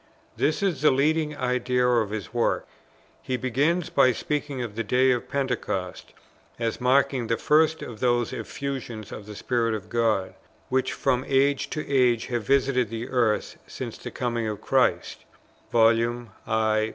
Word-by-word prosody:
This 155 Hz, +6 st, 0 dB
is 175 Hz, -9 st, 0 dB
the 150 Hz, -, +6 dB
leading 150 Hz, +2 st, +1 dB
idea 125 Hz, -1 st, +1 dB
of 115 Hz, -4 st, +2 dB
his 110 Hz, +1 st, -6 dB
work. 120 Hz, -1 st, 0 dB, 0.5 s
He 130 Hz, -, -2 dB
begins 145 Hz, +8 st, 0 dB
by 130 Hz, -, +4 dB
speaking 145 Hz, -3 st, -3 dB
of 115 Hz, -4 st, -6 dB
the 115 Hz, -, -2 dB
Day 130 Hz, +2 st, +3 dB
of 120 Hz, -1 st, -2 dB
Pentecost, 125 Hz, -9 st, -3 dB, 0.4 s
as 115 Hz, 0 st, -2 dB
marking 130 Hz, -1 st, +2 dB
"the 115 Hz, -, 0 dB
first 155 Hz, +5 st, +3 dB
of 115 Hz, -3 st, -8 dB
those 120 Hz, -2 st, +1 dB
Effusions 130 Hz, -6 st, -5 dB
of 105 Hz, -, -8 dB
the 105 Hz, -, -8 dB
Spirit 115 Hz, 0 st, 0 dB
of 100 Hz, -4 st, -8 dB
God, 110 Hz, -5 st, 0 dB, 0.4 s
which 130 Hz, 0 st, +1 dB
from 125 Hz, 0 st, 0 dB
age 140 Hz, +1 st, +2 dB
to 155 Hz, -, -4 dB
age 125 Hz, -5 st, +2 dB
have 120 Hz, -, +1 dB
visited 130 Hz, -1 st, +2 dB
the 115 Hz, +2 st, -5 dB
earth 120 Hz, -5 st, 0 dB
since -, -, -6 dB
the -, -, -8 dB
coming 120 Hz, -2 st, -2 dB
of 105 Hz, -1 st, -4 dB
Christ." -, -, 0 dB, 0.5 s
Vol. 115 Hz, +1 st, +3 dB, 0.2 s
i. 110 Hz, -1 st, +1 dB
125 Hz, 160 wpm, -25 LUFS, 115-135 Hz, 0.5 s, the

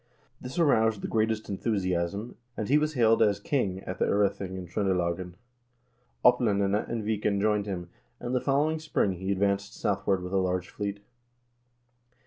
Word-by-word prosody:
This 125 Hz, +5 st, -7 dB
aroused 110 Hz, -, +3 dB
the -, -, -1 dB
greatest 110 Hz, 0 st, 0 dB
enthusiasm, 100 Hz, 0 st, -2 dB, 0.2 s
and 110 Hz, -, -3 dB
he 145 Hz, +3 st, +5 dB
was 150 Hz, 0 st, -1 dB
hailed 115 Hz, -2 st, +4 dB
as 100 Hz, -1 st, +3 dB
king 100 Hz, -10 st, -1 dB
at 90 Hz, -, -6 dB
the -, -, +3 dB
0rething 100 Hz, -2 st, 0 dB
in 90 Hz, -, -6 dB
Tr0ndelagen. 90 Hz, -1 st, -1 dB, 0.9 s
Oplandene 105 Hz, -4 st, +3 dB
and 115 Hz, -2 st, -2 dB
Viken 105 Hz, -1 st, 0 dB
joined 105 Hz, 0 st, +1 dB
him, 90 Hz, -3 st, -5 dB, 0.3 s
and 120 Hz, -, -4 dB
the 125 Hz, -, +1 dB
following 150 Hz, +3 st, +1 dB
spring 155 Hz, -10 st, 0 dB
he 95 Hz, +2 st, -3 dB
advanced 100 Hz, 0 st, 0 dB
south 100 Hz, -1 st, -2 dB
ward 95 Hz, -2 st, +2 dB
with 90 Hz, +1 st, -6 dB
a -, -, +3 dB
large 90 Hz, -1 st, 0 dB
fleet. 100 Hz, -1 st, -4 dB
100 Hz, 160 wpm, -28 LUFS, 95-115 Hz, 0.9 s, he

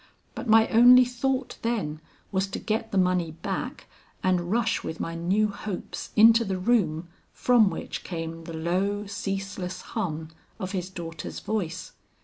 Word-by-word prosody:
But 255 Hz, -, -6 dB
my 220 Hz, 0 st, +6 dB
only 245 Hz, +2 st, +8 dB
thought 255 Hz, +1 st, -2 dB
then, 200 Hz, -10 st, -2 dB, 0.3 s
was 190 Hz, 0 st, 0 dB
to 195 Hz, -, -5 dB
get 225 Hz, +1 st, -2 dB
the 195 Hz, -, 0 dB
money 180 Hz, -2 st, +2 dB
back 215 Hz, +8 st, -4 dB, 0.4 s
and 180 Hz, -2 st, +1 dB
rush 225 Hz, 0 st, +1 dB
with 160 Hz, -, -5 dB
my 165 Hz, -, -3 dB
new 190 Hz, +6 st, +1 dB
hopes 200 Hz, -1 st, -6 dB
into 225 Hz, +2 st, +7 dB
the 195 Hz, -3 st, -2 dB
room 180 Hz, -6 st, +1 dB, 0.3 s
from 240 Hz, -5 st, +4 dB
which 165 Hz, -, -5 dB
came 165 Hz, -1 st, -5 dB
the 165 Hz, -, -7 dB
low 195 Hz, +5 st, 0 dB
ceaseless 195 Hz, -2 st, -4 dB
hum 160 Hz, -8 st, -3 dB, 0.3 s
of 185 Hz, -2 st, -4 dB
his 185 Hz, -2 st, -3 dB
daughter's 165 Hz, -3 st, -7 dB
voice. 185 Hz, -5 st, -3 dB
195 Hz, 150 wpm, -26 LUFS, 175-225 Hz, 0.4 s, only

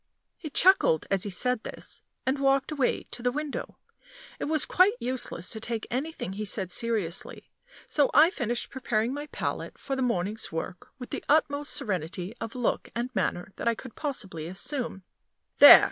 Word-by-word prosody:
He 310 Hz, -, -7 dB
chuckled 320 Hz, -, +4 dB
as 195 Hz, -1 st, +2 dB
he -, -, -2 dB
said 250 Hz, +6 st, +1 dB
this, -, -, -4 dB, 0.2 s
and 265 Hz, +2 st, +1 dB
walked 275 Hz, +1 st, +2 dB
away 285 Hz, -5 st, 0 dB
to 240 Hz, -, -5 dB
the 245 Hz, +1 st, +1 dB
window. 300 Hz, +2 st, -5 dB, 0.6 s
It -, -, -2 dB
was 310 Hz, 0 st, +3 dB
quite 380 Hz, +5 st, +4 dB
useless 250 Hz, -8 st, -1 dB
to 220 Hz, -, -2 dB
take 225 Hz, 0 st, -3 dB
anything 265 Hz, -, -3 dB
he 210 Hz, +2 st, -4 dB
said 195 Hz, -3 st, -1 dB
seriously, 215 Hz, -6 st, -2 dB, 0.3 s
so 290 Hz, -3 st, +3 dB
I 315 Hz, +5 st, +6 dB
finished 240 Hz, -, -2 dB
preparing 240 Hz, -2 st, -1 dB
my 290 Hz, +1 st, -5 dB
palette -, -, -4 dB
for 275 Hz, -1 st, -4 dB
the 265 Hz, -, -2 dB
morning's 215 Hz, -3 st, -1 dB
work 165 Hz, +2 st, -5 dB
with 250 Hz, -2 st, -9 dB
the -, -, -4 dB
utmost 290 Hz, -1 st, +2 dB
serenity 180 Hz, 0 st, -2 dB
of 230 Hz, +1 st, -5 dB
look 245 Hz, -2 st, -1 dB
and 245 Hz, +2 st, -3 dB
manner 190 Hz, -1 st, -2 dB
that -, -, -3 dB
I 230 Hz, -, +3 dB
could 245 Hz, 0 st, -10 dB
possibly 190 Hz, -, -3 dB
assume. 195 Hz, -, -3 dB, 0.6 s
"There!" -, -, +12 dB
240 Hz, 175 wpm, -28 LUFS, 195-280 Hz, 0.6 s, There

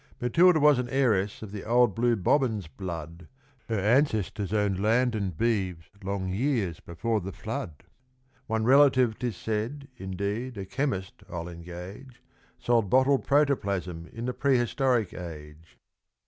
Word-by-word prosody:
Matilda 165 Hz, +8 st, +4 dB
was 145 Hz, -3 st, +5 dB
an 125 Hz, -1 st, -3 dB
heiress 110 Hz, -7 st, +1 dB
of 105 Hz, -, -8 dB
the 105 Hz, -1 st, -6 dB
old 120 Hz, -1 st, +3 dB
blue 120 Hz, +3 st, +2 dB
Bobbins' 110 Hz, -, +1 dB
blood, 85 Hz, +1 st, -7 dB, 0.4 s
Her 110 Hz, -, 0 dB
ancestors 105 Hz, -, +1 dB
owned 100 Hz, -3 st, 0 dB
land 120 Hz, +3 st, +2 dB
and 100 Hz, -7 st, -3 dB
beeves 95 Hz, -8 st, -1 dB
long 95 Hz, -1 st, -2 dB
years 110 Hz, -, 0 dB
before 110 Hz, +6 st, -2 dB
the 95 Hz, +2 st, -5 dB
flood; 75 Hz, -4 st, -6 dB, 0.6 s
One 110 Hz, 0 st, 0 dB
relative, 130 Hz, -2 st, +4 dB
'tis 120 Hz, -7 st, -3 dB
said, 115 Hz, +6 st, -3 dB
indeed 100 Hz, +6 st, -4 dB
a 95 Hz, -, -4 dB
chemist, 95 Hz, -5 st, -3 dB
I'll 85 Hz, -1 st, -5 dB
engage 90 Hz, +9 st, -10 dB, 0.3 s
Sold 115 Hz, -5 st, +1 dB
bottled 130 Hz, +3 st, +3 dB
Protoplasm 100 Hz, -, 0 dB
in 115 Hz, +1 st, -6 dB
the 125 Hz, -, -2 dB
prehistoric 125 Hz, -4 st, +1 dB
age. 80 Hz, -2 st, -10 dB
110 Hz, 135 wpm, -27 LUFS, 95-125 Hz, 0.6 s, was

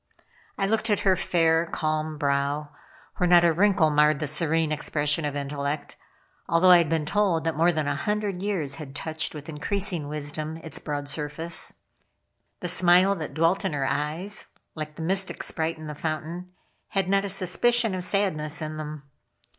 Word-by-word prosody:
I 195 Hz, -, +1 dB
looked 220 Hz, +2 st, 0 dB
at 205 Hz, -, +2 dB
her 190 Hz, -2 st, +4 dB
fair, 165 Hz, -2 st, +2 dB
calm 155 Hz, -1 st, -2 dB
brow, 140 Hz, +1 st, 0 dB, 0.5 s
where 180 Hz, -, +1 dB
not 175 Hz, -1 st, +7 dB
a 170 Hz, -, +4 dB
wrinkle 185 Hz, -3 st, +3 dB
marred 150 Hz, 0 st, +4 dB
the 150 Hz, -, -3 dB
serene 160 Hz, +1 st, +1 dB
expression 150 Hz, +1 st, 0 dB
of 145 Hz, -1 st, -3 dB
intellect, 140 Hz, +1 st, -3 dB, 0.5 s
although 170 Hz, +3 st, +5 dB
I 175 Hz, -, +9 dB
had 165 Hz, -3 st, +1 dB
been 160 Hz, -2 st, 0 dB
told 190 Hz, -2 st, +1 dB
that 165 Hz, -1 st, -1 dB
more 165 Hz, +3 st, +4 dB
than 155 Hz, -3 st, -2 dB
a 145 Hz, -, +1 dB
hundred 205 Hz, +2 st, -2 dB
years 165 Hz, -9 st, -2 dB
had 145 Hz, -3 st, -9 dB
touched 160 Hz, +1 st, -3 dB
with 150 Hz, -1 st, -8 dB
increasing 170 Hz, +1 st, -1 dB
wisdom 150 Hz, +1 st, -4 dB
its 160 Hz, -2 st, -4 dB
broad 145 Hz, -1 st, -4 dB
surface. 150 Hz, +3 st, -2 dB, 0.8 s
The 180 Hz, -, -3 dB
smile 180 Hz, +2 st, +5 dB
that 155 Hz, -4 st, -6 dB
dwelt 165 Hz, +5 st, +2 dB
in 190 Hz, -, -1 dB
her 140 Hz, -2 st, -1 dB
eyes, 165 Hz, +10 st, -2 dB, 0.3 s
like 155 Hz, -1 st, -6 dB
the 160 Hz, -, -6 dB
mystic 190 Hz, +3 st, 0 dB
sprite 160 Hz, 0 st, -1 dB
in 155 Hz, -, -9 dB
the 150 Hz, -, -5 dB
fountain, 160 Hz, +4 st, -5 dB, 0.4 s
had 195 Hz, -2 st, -1 dB
not 195 Hz, +1 st, +2 dB
a 200 Hz, -, -3 dB
suspicion 220 Hz, +4 st, +2 dB
of 185 Hz, -1 st, -2 dB
sadness 165 Hz, -6 st, 0 dB
in 155 Hz, -1 st, -5 dB
them. 150 Hz, -1 st, -6 dB
160 Hz, 180 wpm, -26 LUFS, 150-180 Hz, 0.8 s, I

